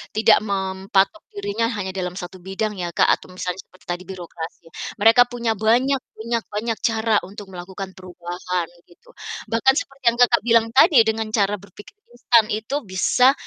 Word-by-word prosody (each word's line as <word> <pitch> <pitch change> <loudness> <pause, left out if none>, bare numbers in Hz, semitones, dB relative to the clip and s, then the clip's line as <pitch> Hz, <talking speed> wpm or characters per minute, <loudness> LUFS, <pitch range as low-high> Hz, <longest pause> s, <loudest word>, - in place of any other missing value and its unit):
tidak 215 0 +6
mempatok 195 +1 0
dirinya 205 +3 -2
hanya 190 -2 -3
dalam 180 0 -3
1 180 +1 -8
bidang 210 +3 -2
ya 175 - -2
Kak - - +5
atau - - -15
misalnya 185 0 -4
seperti 185 - -23
tadi 175 +1 -4
birokrasi. 170 -2 -8 0.4
Mereka 225 +3 +7
punya 235 -2 -1
banyak 260 +4 +3 0.2
punya 230 +2 -1 0.2
banyak 225 +1 -2
cara 225 0 0
untuk 205 +1 -10
melakukan 190 +2 -7
perubahan 180 -1 -4 0.2
gitu. 175 - -22 0.4
Bahkan 230 +4 +4
seperti 275 0 -4
yang 235 - -3
Kakak 240 -1 +5
bilang 230 -1 +4
tadi, 275 +3 +6
dengan 220 0 -1
cara 205 0 +2
berpikir 200 - -14 0.2
instan 235 -2 +4
itu 220 +6 -3
bisa 250 +7 +3
205 Hz, 160 wpm, -22 LUFS, 185-230 Hz, 0.4 s, Mereka